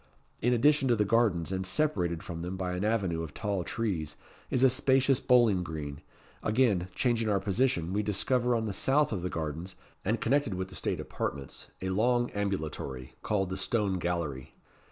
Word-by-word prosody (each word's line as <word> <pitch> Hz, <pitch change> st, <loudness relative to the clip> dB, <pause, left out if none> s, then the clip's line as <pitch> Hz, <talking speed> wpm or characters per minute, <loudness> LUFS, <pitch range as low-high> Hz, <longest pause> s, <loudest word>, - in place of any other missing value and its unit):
In 120 Hz, -, +2 dB
addition 135 Hz, +3 st, +4 dB
to 120 Hz, -, +4 dB
the 105 Hz, -1 st, +2 dB
gardens, 100 Hz, -6 st, +2 dB
and 95 Hz, 0 st, -1 dB
separated 95 Hz, -, 0 dB
from 85 Hz, -1 st, -6 dB
them 90 Hz, +2 st, -4 dB
by 90 Hz, -1 st, -2 dB
an 90 Hz, +2 st, -2 dB
avenue 100 Hz, -7 st, 0 dB
of 80 Hz, -3 st, -7 dB
tall 100 Hz, -4 st, -1 dB
trees, 85 Hz, -9 st, -3 dB, 0.3 s
is 130 Hz, -, +1 dB
a 130 Hz, -, +8 dB
spacious 135 Hz, 0 st, +3 dB
bowling 120 Hz, -9 st, +4 dB
green. 75 Hz, -4 st, -5 dB, 0.4 s
Again 105 Hz, -6 st, +2 dB
changing 115 Hz, -3 st, +1 dB
our 100 Hz, -2 st, +2 dB
position, 95 Hz, -4 st, 0 dB
we 105 Hz, -, +1 dB
discover, 120 Hz, +4 st, +1 dB
on 115 Hz, -1 st, 0 dB
the 105 Hz, -, -2 dB
south 145 Hz, +8 st, +2 dB
of 100 Hz, -5 st, -2 dB
the 90 Hz, -, -2 dB
gardens, 80 Hz, +3 st, -4 dB, 0.3 s
and 110 Hz, +4 st, 0 dB
connected 135 Hz, -4 st, +1 dB
with 95 Hz, 0 st, -3 dB
the -, -, -10 dB
state -, -, -1 dB
apartments, 70 Hz, -1 st, -5 dB, 0.2 s
a 95 Hz, -, -1 dB
long 120 Hz, +5 st, +2 dB
ambulatory, 80 Hz, -10 st, -3 dB
called 95 Hz, -3 st, 0 dB
the 95 Hz, -, -2 dB
Stone 100 Hz, -3 st, 0 dB
Gallery. 85 Hz, -7 st, -3 dB
100 Hz, 180 wpm, -30 LUFS, 85-120 Hz, 0.4 s, a